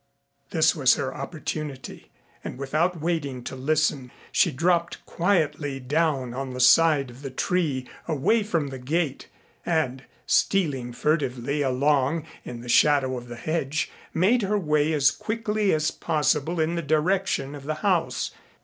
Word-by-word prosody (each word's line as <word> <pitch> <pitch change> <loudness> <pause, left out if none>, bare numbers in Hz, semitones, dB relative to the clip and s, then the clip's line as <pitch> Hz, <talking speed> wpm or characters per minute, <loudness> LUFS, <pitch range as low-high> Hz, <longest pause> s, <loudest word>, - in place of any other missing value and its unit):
This 160 0 +3
was 135 -5 +4
her 130 0 -3
opportunity, 150 -1 -6 0.3
and - - -6
without 155 +6 0
waiting 150 -6 -2
to 130 - -6
listen 145 -1 0 0.2
she 180 - +3
dropped 170 +4 0
quietly 155 -6 0
down 135 -2 0
on 130 0 -5
the - - -5
side 140 0 +5
of 125 +3 -14
the 140 - -5
tree 135 -2 -1 0.2
away 165 - +2
from 165 -9 -1
the 135 -1 -7
gate 145 +2 -2 0.4
and, 135 -6 -1 0.2
stealing 145 -11 +1
furtively 140 0 -1
along 140 +3 +1 0.2
in 120 -1 -7
the 120 - -10
shadow 135 0 +4
of 120 -1 -7
the 120 - -7
hedge, 155 +3 -2 0.2
made 205 +9 +3
her 205 +1 0
way 150 -4 +1
as 140 -2 +4
quickly 215 +2 -1
as 155 0 +1
possible 155 +1 0
in 160 +1 +1
the 170 - -1
direction 155 -1 0
of 140 -2 -9
the 155 +1 -2
house. 180 -5 +1
150 Hz, 150 wpm, -25 LUFS, 135-165 Hz, 0.4 s, side